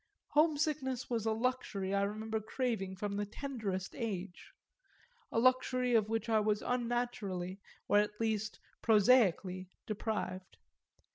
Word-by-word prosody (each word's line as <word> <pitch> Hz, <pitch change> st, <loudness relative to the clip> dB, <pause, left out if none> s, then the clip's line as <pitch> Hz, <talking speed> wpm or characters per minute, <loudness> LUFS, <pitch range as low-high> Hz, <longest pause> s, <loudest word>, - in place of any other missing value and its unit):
Homesickness 295 Hz, -5 st, +1 dB
was 225 Hz, -2 st, 0 dB
a -, -, +3 dB
luxury 220 Hz, -5 st, -1 dB
I 200 Hz, -, +2 dB
remember 215 Hz, +2 st, -1 dB
craving 215 Hz, -4 st, -2 dB
from 200 Hz, +1 st, -3 dB
the 205 Hz, -, 0 dB
tenderest 210 Hz, -6 st, -4 dB
age 200 Hz, -6 st, -5 dB, 0.8 s
a -, -, -2 dB
luxury 255 Hz, 0 st, +3 dB
of 215 Hz, -2 st, +3 dB
which 225 Hz, +1 st, -1 dB
I 220 Hz, -1 st, +4 dB
was 210 Hz, 0 st, +1 dB
unnaturally, 235 Hz, -7 st, -2 dB, 0.3 s
or 205 Hz, -, +5 dB
at 210 Hz, 0 st, -1 dB
least 220 Hz, -1 st, -1 dB, 0.2 s
prosaically, 200 Hz, -5 st, +4 dB, 0.2 s
deprived. 210 Hz, -3 st, -3 dB
220 Hz, 125 wpm, -34 LUFS, 200-245 Hz, 0.8 s, or